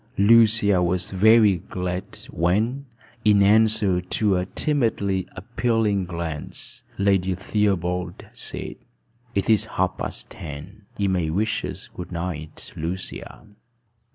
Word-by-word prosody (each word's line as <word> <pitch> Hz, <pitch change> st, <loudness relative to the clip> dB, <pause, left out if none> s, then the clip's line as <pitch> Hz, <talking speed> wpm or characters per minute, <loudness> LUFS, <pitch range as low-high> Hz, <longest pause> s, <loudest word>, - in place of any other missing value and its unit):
Lucia 105 Hz, -2 st, +5 dB
was 90 Hz, +1 st, 0 dB
very 105 Hz, 0 st, +5 dB
glad 90 Hz, +1 st, -5 dB
when, 110 Hz, -, 0 dB, 0.4 s
in 105 Hz, -2 st, +5 dB
answer 105 Hz, -3 st, +4 dB
to 95 Hz, +2 st, +1 dB
a 90 Hz, 0 st, -1 dB
timidly 105 Hz, -, 0 dB
appealing 110 Hz, -1 st, 0 dB
glance, 85 Hz, -3 st, -6 dB, 0.2 s
Lady 95 Hz, -2 st, +2 dB
Theobald 90 Hz, -3 st, -1 dB
said, -, -, -4 dB, 0.6 s
"It 100 Hz, -1 st, 0 dB
is 110 Hz, -2 st, +4 dB
half -, -, 0 dB
past -, -, -6 dB
ten. 85 Hz, +7 st, -9 dB
You 100 Hz, -1 st, +1 dB
may 90 Hz, -4 st, 0 dB
wish 110 Hz, +7 st, 0 dB
us -, -, -6 dB
good 90 Hz, 0 st, -9 dB
night, 85 Hz, -3 st, -6 dB
Lucia." 90 Hz, +6 st, -5 dB
95 Hz, 115 wpm, -23 LUFS, 90-105 Hz, 0.6 s, Lucia